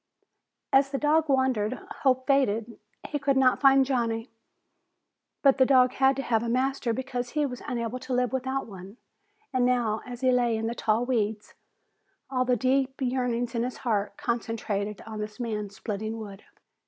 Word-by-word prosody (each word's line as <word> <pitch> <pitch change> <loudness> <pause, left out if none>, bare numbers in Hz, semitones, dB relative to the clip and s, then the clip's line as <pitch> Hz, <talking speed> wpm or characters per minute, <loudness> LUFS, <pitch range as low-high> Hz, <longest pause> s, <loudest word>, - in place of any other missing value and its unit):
As 275 0 +5
the 275 - -2
dog 305 +2 +2
wandered, 260 -5 +2 0.3
hope 260 -1 +2
faded. 235 -5 +1 0.3
He 295 - -2
could 275 -1 +1
not 255 -1 +3
find 270 -1 +6
Johnny. 235 -3 -1 1.1
But 275 -1 +5
the 260 - +6
dog 255 -2 +5
had 270 0 +3
to 275 - -3
have 230 -3 +1
a 235 - -3
master 255 0 0
because 250 0 -3
he 300 +2 0
was 250 -3 -5
unable 235 0 -3
to 255 0 -5
live 250 0 +1
without 265 +1 -2
one, 195 +1 -11 0.6
and 255 -1 +2
now, 240 -4 +1
as 245 0 -9
he 255 -1 +3
lay 240 -2 +2
in 220 - -3
the 230 - -1
tall 225 0 0
weeds, 220 -4 -1 0.8
all 255 -1 +1
the 250 0 +2
deep 265 +2 +1
yearnings 245 -2 -1
in 230 - -1
his 250 +1 -3
heart 210 -4 0
concentrated 215 -4 -3
on 220 -1 -8
this 210 +2 -6
man 215 -4 -3
splitting 215 +2 -5
wood. 205 -2 -9
245 Hz, 175 wpm, -27 LUFS, 225-265 Hz, 1.1 s, find